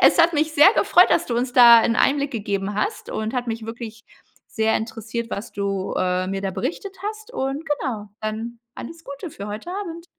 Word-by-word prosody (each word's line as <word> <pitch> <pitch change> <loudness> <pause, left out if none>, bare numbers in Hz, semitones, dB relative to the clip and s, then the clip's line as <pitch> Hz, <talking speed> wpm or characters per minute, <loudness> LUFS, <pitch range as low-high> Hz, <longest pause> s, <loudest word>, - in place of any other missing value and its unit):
Es - - +5
hat 335 +1 +5
mich 310 0 0
sehr 320 +7 +7
gefreut, 360 +1 +5
dass 345 - +2
du 235 - -2
uns 245 +1 -1
da 235 -2 +9
'n 230 0 +1
Einblick 280 0 +2
gegeben 200 -3 -3
hast 210 - -3
und 220 +1 -3
hat 245 -1 -2
mich 225 -1 -4
wirklich 225 -1 -8 0.4
sehr 220 0 +1
interessiert 225 +1 -5
was 200 - -5
du, 195 -1 -2
äh, 185 0 0
mir 195 0 -3
da 195 -1 -2
berichtet 295 - -4
hast 430 +3 -6
und, 270 - -3
genau. 255 -8 -3
Dann 225 +2 -5 0.2
alles 325 +6 -9
Gute 280 +4 -7
für 200 -3 -8
heute 215 +12 -6
Abend. 345 -4 -6
235 Hz, 200 wpm, -22 LUFS, 215-300 Hz, 0.4 s, da